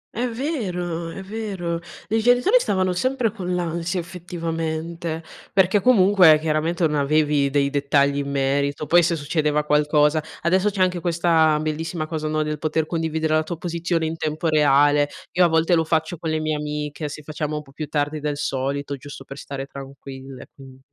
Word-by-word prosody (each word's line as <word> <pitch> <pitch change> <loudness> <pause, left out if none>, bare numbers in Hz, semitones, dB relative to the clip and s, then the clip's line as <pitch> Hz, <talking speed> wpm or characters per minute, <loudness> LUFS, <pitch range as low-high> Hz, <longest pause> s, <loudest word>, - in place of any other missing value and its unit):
È 245 +2 0
vero, 180 - -3
è 190 +3 -7
vero. 190 -5 -4 0.3
I 220 +1 +1
genitori 245 - +4
stavano 185 - 0
sempre 250 +2 0
con 180 -4 -3
l'ansia 170 +1 -2
effettivamente, 165 -1 -4 0.3
perché 195 +1 +3
comunque 190 -8 +6
chiaramente 160 +2 0
non 150 -1 +1
avevi 145 -1 +2
dei 140 0 +1
dettagli 140 0 +2
in 140 0 -2
merito, 140 +2 0
poi 175 +4 +5
se 170 0 +1
succedeva 150 0 0
qualcosa 150 +1 +3 0.2
adesso 185 +4 +2
c'è 195 -2 +1
anche 180 -1 0
questa 165 -3 +3
bellissima 155 +1 -3
cosa, 155 -1 -4
no, 155 0 0
del 150 -1 -3
poter 155 0 0
condividere 160 -1 -1
la 155 - +4
tua 160 +1 -5
posizione 170 -1 -2
in 160 +1 -2
tempo 155 +1 -2
reale. 145 -1 +4 0.2
Io 180 -1 +4
a - - +5
volte 160 +1 +2
lo 165 -1 +4
faccio 160 +1 -1
con 165 - -3
le 155 - 0
mie 155 -1 -1
amiche, 150 0 -4
se 150 +1 -8
facciamo 150 0 -4
un 150 - -4
po' 135 - -18
più 155 +1 -6
tardi 150 +1 -1
del 145 -1 -2
solito 140 +1 -2
giusto 140 0 -10
per 135 +2 -10
stare 135 -1 -6
tranquille 135 -1 -10
quin 135 -1 -14
160 Hz, 180 wpm, -22 LUFS, 150-175 Hz, 0.3 s, comunque